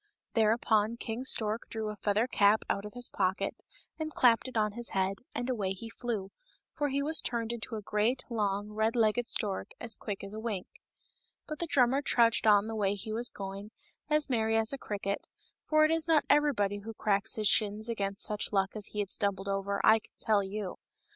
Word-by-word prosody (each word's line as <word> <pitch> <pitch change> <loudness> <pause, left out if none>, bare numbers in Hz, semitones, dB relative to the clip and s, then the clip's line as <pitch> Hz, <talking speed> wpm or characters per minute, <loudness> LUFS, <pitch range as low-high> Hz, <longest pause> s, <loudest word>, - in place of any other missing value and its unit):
Thereupon 220 0 +2
King 235 +2 -4
Stork 220 -3 -1
drew 220 -1 -3
a 210 - -5
feather 210 +2 +1
cap 210 -3 +3
out 200 - -1
of 210 - -9
his 245 0 0
pocket 190 0 -1 0.4
and 310 0 -3
clapped 245 -3 +4
it 255 - -5
on 210 -1 +2
his 240 +3 -2
head, 190 +1 0 0.2
and 245 - -2
away 205 -7 -1
he 225 +4 -8
flew, 220 -6 -4 0.4
for 290 -1 -1
he 280 +1 0
was 315 +2 +1
turned 235 -1 -2
into 230 -1 -5
a 215 - -5
great, 215 +6 0
long, 205 -3 -1
red 220 +2 0
legged 230 +1 +2
stork 205 -6 -2
as 230 -2 -3
quick 205 -3 -6
as 200 +1 -8
a 215 - -5
wink. 215 -5 -3 0.8
But 305 -1 -6
the 340 - -2
drummer 265 -2 +3
trudged 235 -5 +3
on 205 -1 +6
the 225 - -4
way 205 -2 0
he 210 +2 -5
was 235 +2 +1
going, 195 +1 -7 0.4
as 300 -1 +2
merry 225 -4 +1
as 225 +3 0
a - - -2
cricket, 200 -3 -3 0.4
for 310 0 +5
it 310 - +2
is 325 0 +1
not 320 -2 +4
everybody 245 -9 +2
who 225 +2 -8
cracks 210 0 0
his 215 -1 +2
shins 215 +1 +3
against 200 -3 -1
such 210 -1 -1
luck 195 -1 +1
as 210 -2 -3
he 210 - -3
had 200 - -5
stumbled 200 -2 -1
over, 200 0 -1
I 220 - +6
can - - -24
tell 215 -2 +2
you. 195 -1 -5
220 Hz, 205 wpm, -31 LUFS, 200-240 Hz, 0.8 s, on